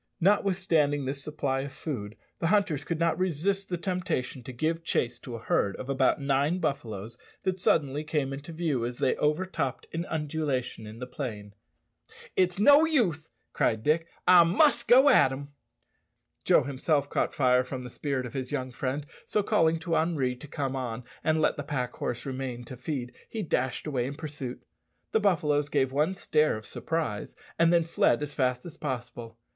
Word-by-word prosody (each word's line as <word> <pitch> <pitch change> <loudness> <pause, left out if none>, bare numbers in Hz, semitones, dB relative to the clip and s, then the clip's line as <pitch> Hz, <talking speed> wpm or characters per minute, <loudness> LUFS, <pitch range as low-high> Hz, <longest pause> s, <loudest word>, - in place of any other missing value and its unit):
Notwithstanding 175 -7 +2
this 135 +1 -3
supply 140 -3 -1
of 135 +1 -4
food, 115 -9 -5 0.2
the 165 - 0
hunters 190 -7 +2
could 165 -2 -3
not 170 +1 +1
resist 185 +3 0
the 175 - -1
temptation 180 -8 -2
to 125 - -8
give 160 +6 -1
chase 125 -7 0
to 120 - -7
a - - -6
herd 100 -1 +1
of 130 - -7
about 135 0 +2
nine 140 +4 +1
buffaloes 110 - -3 0.2
that 185 -1 -1
suddenly 150 -4 +2
came 150 -3 -1
into 145 +4 -7
view 160 -7 -1
as 120 +1 -3
they 130 - +2
overtopped 150 -3 -1
an 170 +2 -3
undulation 145 -7 -2
in 110 +1 -9
the 125 - -5
plain. 110 -6 -6 0.8
"It's 180 -1 +2
no 285 +9 +7
use," 205 - +1 0.2
cried 110 -1 +1
Dick, 165 +2 +2 0.2
"I 180 -1 +9
must 240 - +3
go 260 +4 +7
at 260 - +7
them!" 135 +2 -6 1.0
Joe - - +5
himself 140 +1 0
caught - - -1
fire 125 -2 +4
from 130 0 -6
the 125 - -8
spirit 135 -2 -2
of 120 - -8
his 130 -2 -4
young 130 -3 -2
friend, 135 +3 -3 0.2
so 210 - +1
calling 165 -4 +3
to 165 0 -1
Henri 150 -6 +1
to 150 - -10
come 135 -2 -3
on 125 -2 -4 0.2
and 155 -1 +2
let 155 - +2
the 145 - -3
pack 130 -4 -3
horse 120 0 -3
remain 130 -2 -4
to 130 - -9
feed, 125 -1 -4 0.2
he 220 -2 -3
dashed 130 -5 -1
away 130 -5 -1
in 140 - -5
pursuit. 145 -5 -6 0.5
The 220 - +3
buffaloes 155 -8 +2
gave 130 -2 +1
one 150 +7 +1
stare 155 - +2
of 110 - -10
surprise, 155 -10 -3 0.2
and 165 0 +5
then 170 -1 +4
fled 150 -4 +2
as 145 0 -5
fast 125 -3 0
as 170 - -9
possible. 120 -4 -5
145 Hz, 185 wpm, -28 LUFS, 130-165 Hz, 1.0 s, I